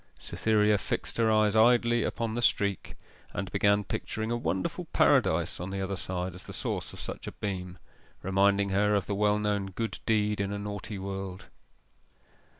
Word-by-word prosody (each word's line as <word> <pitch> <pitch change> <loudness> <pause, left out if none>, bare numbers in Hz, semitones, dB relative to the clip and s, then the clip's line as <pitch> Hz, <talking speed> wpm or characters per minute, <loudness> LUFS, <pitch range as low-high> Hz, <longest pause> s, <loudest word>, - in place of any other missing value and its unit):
Cytherea 105 -2 +2
fixed - - -3
her 115 -1 +3
eyes 110 -1 +3
idly 120 +1 +5
upon 115 0 -2
the 120 - -2
streak, 100 -4 +1 0.4
and 100 -2 -4
began 100 +1 +3
picturing 110 +3 -3
a - - +1
wonderful 95 -4 -2
paradise 85 +2 +2
on 90 +2 -4
the 95 0 -4
other 95 0 -2
side 90 0 -4
as 90 - -10
the - - -9
source - - -3
of - - -11
such - - -6
a - - -5
beam 90 -3 -4 0.5
reminding 100 +1 +3
her 105 +2 +2
of 100 -2 0
the 100 - -2
well 105 +1 +2
known 105 -2 0
good 110 +4 -4
deed 105 -2 +2
in 100 0 -2
a 100 - -2
naughty 105 0 -5
world. 95 -1 -5
100 Hz, 175 wpm, -29 LUFS, 95-105 Hz, 0.5 s, idly